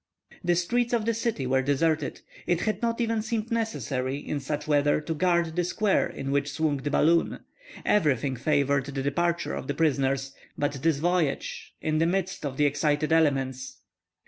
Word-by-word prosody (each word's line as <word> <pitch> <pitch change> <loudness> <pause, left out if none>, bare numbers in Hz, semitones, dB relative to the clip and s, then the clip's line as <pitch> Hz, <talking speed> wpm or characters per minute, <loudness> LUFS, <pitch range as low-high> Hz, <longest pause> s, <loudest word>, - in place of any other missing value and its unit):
The 175 0 +2
streets 240 +8 0
of 230 -3 +1
the 230 - +2
city 225 - -2
were 130 +1 +2
deserted; 145 +2 0 0.3
it 175 -1 +1
had 215 - -1
not 230 0 0
even 230 -2 +1
seemed 225 +1 -3
necessary, 140 - -1
in 145 0 -4
such 150 +2 -4
weather, 145 -1 +3
to 160 +2 -3
guard 170 0 +1
the 180 - +1
square 200 +3 +1
in 135 0 -5
which 140 0 0
swung 150 0 0
the 140 +2 -3
balloon. 165 +3 +2 0.4
Everything 140 - +2
favored 140 0 +1
the 135 -1 -3
departure 170 +5 0
of - - -5
the 145 - -2
prisoners; 135 -3 +1 0.2
but 145 0 0
this 160 -2 +2
voyage, 170 -2 -1
in 155 0 0
the 165 - +3
midst 185 -3 -1
of 135 -1 -6
the 150 - +3
excited 145 +1 +1
elements! 135 -5 +1
155 Hz, 175 wpm, -27 LUFS, 140-175 Hz, 0.4 s, weather